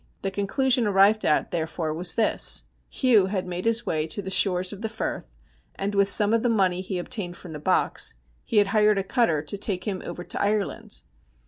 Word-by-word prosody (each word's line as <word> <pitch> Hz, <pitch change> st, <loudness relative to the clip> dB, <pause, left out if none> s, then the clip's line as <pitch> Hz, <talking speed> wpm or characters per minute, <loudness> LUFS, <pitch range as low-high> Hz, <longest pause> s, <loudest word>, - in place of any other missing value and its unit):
The 195 Hz, -, -1 dB
conclusion 240 Hz, +5 st, +1 dB
arrived 205 Hz, +2 st, +4 dB
at, 150 Hz, -, +1 dB
there 165 Hz, -2 st, -2 dB
fore, 160 Hz, -2 st, -4 dB
was 175 Hz, +2 st, -1 dB
this: 225 Hz, -, +2 dB, 0.3 s
Hugh 225 Hz, -8 st, +3 dB
had 190 Hz, -1 st, -3 dB
made 180 Hz, +1 st, -5 dB
his 230 Hz, 0 st, +2 dB
way 155 Hz, 0 st, -1 dB
to 200 Hz, +5 st, -3 dB
the 190 Hz, -, -5 dB
shores 185 Hz, 0 st, +3 dB
of 205 Hz, -, -10 dB
the 220 Hz, -, -3 dB
Firth, 220 Hz, -, -5 dB, 0.5 s
and 200 Hz, +1 st, -3 dB
with 200 Hz, 0 st, +2 dB
some 210 Hz, +1 st, +4 dB
of 230 Hz, -, +2 dB
the 245 Hz, -, +1 dB
money 190 Hz, -5 st, +1 dB
he 190 Hz, 0 st, -5 dB
obtained 175 Hz, 0 st, -4 dB
from 170 Hz, -, -10 dB
the 150 Hz, -, -7 dB
box 145 Hz, -, 0 dB, 0.3 s
he 225 Hz, -, -2 dB
had 205 Hz, -, +6 dB
hired 210 Hz, -1 st, +4 dB
a 195 Hz, -, 0 dB
cutter 190 Hz, -, +1 dB
to 180 Hz, +6 st, -5 dB
take 185 Hz, -3 st, -2 dB
him 190 Hz, -3 st, -3 dB
over 175 Hz, 0 st, -7 dB
to -, -, -4 dB
Ireland. 205 Hz, -1 st, -2 dB
195 Hz, 215 wpm, -25 LUFS, 180-215 Hz, 0.5 s, had